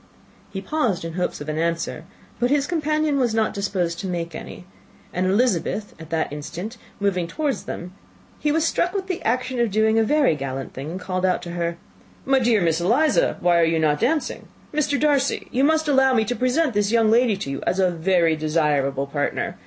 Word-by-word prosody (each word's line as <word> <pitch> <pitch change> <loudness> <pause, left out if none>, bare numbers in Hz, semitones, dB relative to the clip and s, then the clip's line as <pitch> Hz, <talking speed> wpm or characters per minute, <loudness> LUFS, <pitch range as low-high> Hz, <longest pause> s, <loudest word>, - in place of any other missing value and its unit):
He 195 - -5
paused 215 - -1
in 165 - -5
hopes 180 -2 -2
of 145 - -7
an 155 0 -2
answer: 165 -1 -2 0.3
but 245 +1 +2
his 285 0 +2
companion 305 -3 0
was 240 -4 +1
not 220 -1 +1
disposed 185 -4 -2
to 195 - -4
make 170 -2 -3
any; 180 - -9 0.5
and 185 +1 0
Elizabeth 205 -1 0
at 160 -1 -10
that 160 -3 -1
instant 175 +10 -6 0.2
moving 185 -4 0
towards 280 - -2
them, 180 +1 -6 0.5
he 300 - +1
was 320 +1 +2
struck 355 +3 0
with 385 -1 -1
the 370 -2 -4
notion 250 +2 -1
of 235 -1 +2
doing 220 +2 +3
a - - +4
very 280 - +3
gallant 135 -2 -5
thing, 135 +3 -6
and 180 +3 -5
called 185 0 -3
out 185 -1 +1
to 175 - -6
her, 170 -1 -2 0.5
"My 270 0 +3
dear 235 -4 +3
Miss 165 -1 +1
Eliza, 305 - +2
why 175 -1 +4
are 165 0 +3
not 150 -2 +1
you - - +4
dancing? 320 -3 -2 0.3
Mr. 290 -2 +1
Darcy, 285 -2 +1
you 260 +2 +1
must 315 +1 +3
allow 265 -2 +4
me 220 -2 +2
to 245 - -2
present 255 +4 +1
this 205 0 +1
young 225 -2 +4
lady 230 -3 +3
to 140 -8 -5
you 140 - -4
as 185 - +1
a 185 -2 +3
very 170 -1 +2
desirable 150 -3 0
partner. 145 +1 -2
200 Hz, 205 wpm, -23 LUFS, 170-265 Hz, 0.5 s, a